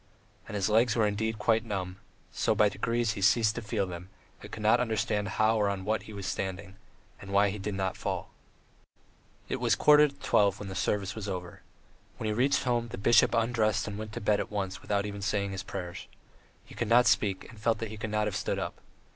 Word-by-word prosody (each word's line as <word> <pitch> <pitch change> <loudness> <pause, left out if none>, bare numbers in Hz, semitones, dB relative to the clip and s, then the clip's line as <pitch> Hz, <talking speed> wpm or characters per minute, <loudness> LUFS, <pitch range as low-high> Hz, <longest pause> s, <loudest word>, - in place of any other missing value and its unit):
And - - -6
his 100 -2 +1
legs 110 +1 +3
were 110 -2 +3
indeed 110 +2 -1
quite 110 +1 +2
numb, 95 -4 -4 0.3
so - - +1
that - - -7
by 105 -2 +5
degrees 115 +3 -1
he 110 -3 -5
ceased 110 +2 +4
to 120 - -5
feel 105 -2 -1
them 90 0 -8 0.3
and - - -11
could 105 - -7
not 110 - +5
understand 110 -3 0
how 110 +1 +3
or 105 -1 +2
on 95 -1 -4
what 110 +1 0
he - - -7
was 100 -2 -7
standing, 95 0 -4 0.5
and 100 - -10
why 100 0 +4
he 105 - -6
did 100 +1 -3
not 95 -1 -1
fall.... - - -4 1.2
It - - -2
was - - +2
a - - -15
quarter 150 0 +6
to 140 - -12
twelve 100 -7 +2
when 105 - -6
the - - -5
service 100 0 -1
was 105 -1 -5
over. 90 -2 -6 0.6
When - - -5
he 110 - 0
reached 130 +6 +2
home, 120 -2 0
the 120 - -7
bishop 120 +4 +4
undressed 115 -3 +1
and 105 - -5
went 110 0 -7
to - - -5
bed 105 0 +2
at - - -3
once 95 -3 -3
without 100 -1 -1
even 100 -1 -6
saying 100 -1 -1
his 95 -1 -4
prayers. 90 -2 -7 0.6
He - - -14
could - - -3
not 120 +1 +6
speak 100 -2 +1
and 115 - -14
felt 115 +1 +2
that 115 - -5
he 110 - -8
could 110 0 -4
not 105 0 0
have 105 - -2
stood - - -1
up. - - -5
105 Hz, 235 wpm, -29 LUFS, 100-110 Hz, 1.2 s, quarter